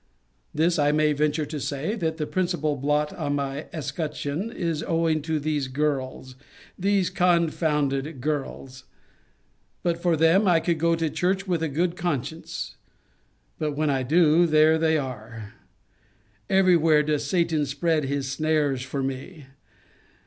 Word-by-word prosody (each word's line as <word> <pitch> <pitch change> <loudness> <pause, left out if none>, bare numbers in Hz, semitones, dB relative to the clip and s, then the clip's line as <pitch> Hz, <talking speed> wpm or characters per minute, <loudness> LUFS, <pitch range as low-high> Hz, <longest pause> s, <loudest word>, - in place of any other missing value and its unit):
This 165 +2 +1
I 145 0 +3
may 150 0 +2
venture 150 +1 0
to 150 +1 -5
say, 145 +8 -3
that 160 -8 -2
the 155 - -2
principal 175 -4 -1
blot 150 +2 0
in 145 0 -2
my 140 +1 -3
escutcheon 155 +4 -4
is 165 -7 -2
owing 165 -1 0
to 160 +1 -1
these 145 -2 -1
girls, 130 -2 -2 0.4
these 195 -1 +1
confounded 155 -5 +1
girls. 135 -2 -4 1.0
But 170 -1 -1
for 170 -2 +2
them, 165 +6 +4
I 170 -2 +5
could 165 -1 -1
go 170 +1 +3
to 165 -1 -1
church 190 +4 0
with 175 -3 0
a 160 - 0
good 170 +5 0
conscience: 160 -2 -4 0.8
but 150 -2 -1
when 155 -1 +1
I 135 -1 0
do, 160 +4 +4
there 155 0 +4
they 160 -1 +2
are. 115 -5 -7 1.0
Every 190 -2 +5
where 155 -2 +4
does 150 -1 -1
Satan 160 -3 +1
spread 155 +2 0
his 140 0 -2
snares 150 -2 0
for 130 +2 -3
me! 135 +4 -6
155 Hz, 145 wpm, -25 LUFS, 140-170 Hz, 1.0 s, I